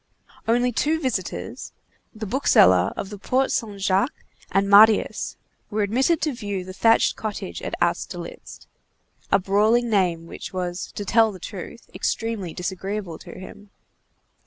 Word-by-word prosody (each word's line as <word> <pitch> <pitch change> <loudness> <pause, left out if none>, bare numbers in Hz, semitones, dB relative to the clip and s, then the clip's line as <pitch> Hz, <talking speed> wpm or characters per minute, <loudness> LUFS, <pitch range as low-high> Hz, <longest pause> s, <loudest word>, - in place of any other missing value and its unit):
Only 245 +2 +2
two 310 +7 +1
visitors, 260 -5 -4 0.4
the 220 -1 -7
bookseller 95 - +4
of 195 - -5
the 205 - -8
Porte 260 +5 +1
Saint 210 -4 -2
Jacques 195 +7 0 0.3
and 195 0 +2
Marius, 210 +2 +5 0.3
were 210 -1 0
admitted 260 +10 +1
to 300 -2 0
view 205 -6 -4
the 185 - -8
thatched 225 +4 +3
cottage 205 - -5
at - - -4
Austerlitz, - - -3 0.7
a - - +6
brawling 215 +5 +2
name 175 -5 +1
which 170 - -8
was, 180 -1 -4
to 205 - -5
tell 225 +2 +4
the 190 - -9
truth, 195 +4 -9
extremely 225 -6 -2
disagreeable 190 0 -4
to - - -11
him. 200 +2 -11
205 Hz, 140 wpm, -23 LUFS, 190-230 Hz, 0.7 s, a